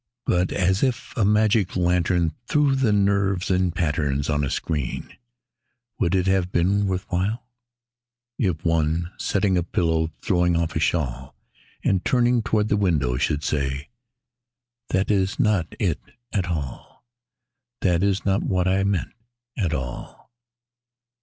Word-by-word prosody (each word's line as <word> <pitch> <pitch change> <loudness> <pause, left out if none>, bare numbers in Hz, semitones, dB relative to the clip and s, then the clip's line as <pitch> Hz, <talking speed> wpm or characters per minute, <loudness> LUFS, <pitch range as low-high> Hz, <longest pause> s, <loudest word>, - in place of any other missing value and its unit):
But 90 +1 +1
as 95 +1 +1
if 130 -3 -1
a 115 - +1
magic 105 -1 +2
lantern 90 -2 +1
threw 145 -2 +3
the 130 -5 +2
nerves 100 -2 +1
in 90 0 +2
patterns 75 -4 -1
on 75 0 +1
a 70 - -1
screen: 75 -3 -3 0.8
Would 90 +1 +1
it 90 -1 +2
have 95 -1 +1
been 100 +4 +2
worth 95 -1 -2
while 100 +7 -1 0.9
If 90 -8 -1
one, 80 +1 +1
settling 95 -2 +1
a - - +1
pillow 80 -2 0
or 80 - -7
throwing 90 -2 +1
off 85 -1 -1
a - - +1
shawl, 65 -7 -1 0.5
And 95 -1 +1
turning 120 -1 +2
toward 110 -2 0
the 105 - +2
window, 75 -11 +1
should 75 +4 0
say: 70 0 -2 1.0
"That 95 +2 +1
is 95 +2 0
not 105 - +2
it 90 -7 0 0.3
at 95 -4 0
all, 75 - -6 0.8
That 90 -2 +2
is 100 0 0
not 100 0 +2
what 90 -1 0
I 95 +1 +2
meant, 100 -5 -1 0.4
at 90 -7 -1
all." 65 - -6
90 Hz, 145 wpm, -23 LUFS, 80-100 Hz, 1.0 s, threw